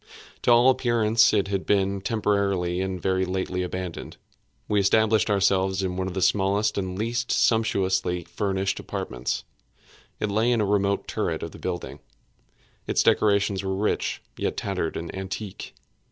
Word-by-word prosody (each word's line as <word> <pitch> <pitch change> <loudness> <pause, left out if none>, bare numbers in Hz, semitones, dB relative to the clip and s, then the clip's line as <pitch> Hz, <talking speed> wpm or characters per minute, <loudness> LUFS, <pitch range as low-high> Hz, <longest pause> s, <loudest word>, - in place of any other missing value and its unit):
To - - +3
all 120 +2 +7
appearance 115 -4 +3
it 100 -2 +1
had 100 -1 -1
been 100 -1 +1
temporarily 100 -4 0
and 95 -1 -3
very 95 +1 0
lately 95 0 -2
abandoned. 90 -1 -5 0.5
We 105 - +2
established 110 +2 +3
ourselves 95 -1 +2
in 90 -1 -2
one 95 0 -2
of 95 - -6
the 95 - 0
smallest 100 +2 +2
and 95 -1 -3
least 120 +3 -2
sumptuously 95 -5 +1
furnished 95 0 -2
apartments. 60 0 -4 0.8
It 105 - -1
lay 110 +4 +2
in 120 - +2
a 105 - +2
remote 100 0 +1
turret - - -2
of - - -5
the - - -12
building. - - -5 0.9
Its - - +2
decorations 100 -2 +2
were 95 0 -1
rich, 105 +2 -1
yet - - -2
tattered 95 -5 -2
and 85 0 -6
antique. 95 +1 -6
100 Hz, 155 wpm, -25 LUFS, 95-105 Hz, 0.9 s, all